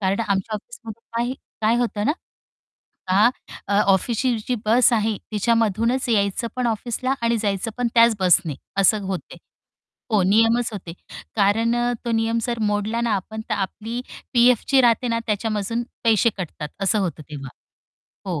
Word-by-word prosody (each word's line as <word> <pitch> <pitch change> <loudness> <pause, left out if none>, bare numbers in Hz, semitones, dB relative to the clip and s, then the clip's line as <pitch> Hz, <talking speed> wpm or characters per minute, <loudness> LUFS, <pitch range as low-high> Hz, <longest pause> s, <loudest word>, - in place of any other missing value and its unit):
कारण 195 +2 0
आमच्या 200 0 -1
ऑफिसमध्ये 225 +1 -9 0.2
काही 240 +2 -1 0.3
काय 220 +2 +3
होतं 230 -4 -1
ना. - - +3 1.0
आ, 200 +5 +5 0.4
अ, 200 - -1
ऑफिसची 230 +5 +1
जी 250 - +1
बस 240 +4 +5
आहे 220 -2 +1
तिच्यामधूनच 230 +3 +1
यायचं 205 +1 +1
पण 250 -1 0
ऑफिसला 240 +4 -1
आणि 230 0 +2
जायचं 205 0 -2
पण 245 -1 +1
त्याच 230 -1 +5
बसने 175 -5 +3 0.2
असं 200 +2 +4
होते. 190 -2 -5 0.8
हो 210 -3 +4
नियमच 225 +5 +3
होते. 185 -5 -7 0.4
कारण 220 +3 +2 0.3
तो 235 - -2
नियम 225 +1 +1
जर 235 0 -2
मोडला 210 +2 0
ना 235 -1 0
आपण 220 +3 -4
तर - - 0
आपली 215 +4 -4 0.3
पी-एफ 245 -1 +5
जी 270 -1 +5
राहते 240 0 +3
ना 230 0 0
त्याच्यामधून 215 +1 -1 0.2
पैसे 230 0 +4
कटतात 165 -5 -6
असं 195 +2 +2
होतं 180 -5 -2
तेव्हा. 140 -2 -7 0.8
हो, 175 -5 -2
220 Hz, 155 wpm, -22 LUFS, 200-235 Hz, 1.0 s, आ